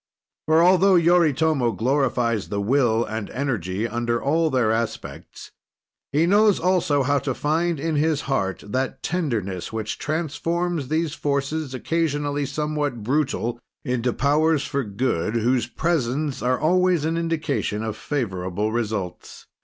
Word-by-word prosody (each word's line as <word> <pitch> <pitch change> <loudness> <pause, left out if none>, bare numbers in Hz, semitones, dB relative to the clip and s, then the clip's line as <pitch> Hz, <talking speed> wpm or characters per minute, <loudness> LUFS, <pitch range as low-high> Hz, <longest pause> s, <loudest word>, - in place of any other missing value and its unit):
For 160 +1 +5
altho 185 +2 +5
Yoritomo 160 -7 +3
glorifies 120 -4 0
the 100 - -2
will 115 +1 +2
and 110 -1 -5
energy 110 -6 -2
under 120 +1 -1
all 160 +5 +1
their 125 -6 +2
aspects, 115 0 -5 0.6
he 150 +4 +3
knows 205 +2 +4
also 165 -6 +2
how 140 +2 +2
to 130 -3 -3
find, 165 +2 0
in 160 +1 -1
his 155 -1 +1
heart, 95 -9 -2
that 130 +6 -3
tenderness 115 - -2
which 110 -1 -4
transforms 165 0 -2
these 155 +1 -1
forces, 140 0 -2
occasionally 145 -1 -1
somewhat 145 -4 -2
brutal, 130 -2 -1 0.3
into 125 -2 0
powers 150 +3 +2
for 140 -1 -1
good, 105 -2 -1
whose 120 +1 +1
presence 145 -1 -1
are 125 +1 +1
always 180 -1 +2
an 165 +1 0
indication 160 -10 -1
of 110 -1 -3
favorable 105 -7 -2
results. 110 -6 -4
140 Hz, 130 wpm, -23 LUFS, 115-160 Hz, 0.6 s, For